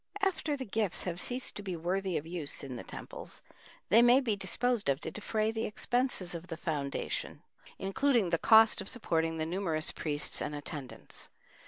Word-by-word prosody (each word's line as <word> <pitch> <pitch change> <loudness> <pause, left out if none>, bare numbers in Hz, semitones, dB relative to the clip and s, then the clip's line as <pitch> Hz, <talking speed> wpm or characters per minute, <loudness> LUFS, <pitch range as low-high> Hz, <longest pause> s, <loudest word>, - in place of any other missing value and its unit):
After 325 -6 +1
the 260 - -4
gifts 210 -3 0
have 175 -1 -2
ceased 250 +6 0
to - - -3
be 190 -3 -4
worthy 185 +2 -1
of 145 - -4
use 165 -4 -4
in 130 -2 -5
the 120 - -6
temples, - - -8 0.5
they 225 +5 +7
may 240 +2 +7
be 235 -6 0
disposed 205 - 0
of 135 0 +2
to - - -4
defray 215 +1 -1
the 225 0 -2
expenses 240 -4 0
of 170 +1 -6
the 165 - -5
foundation, 145 -5 -3 0.3
including 210 0 +2
the 165 - +2
cost 220 -1 +7
of - - -1
supporting 165 -9 0
the 155 - -1
numerous 165 -3 -1
priests 145 -2 -1
and 150 0 -2
attendants. 145 -2 -5
190 Hz, 180 wpm, -32 LUFS, 160-225 Hz, 0.5 s, they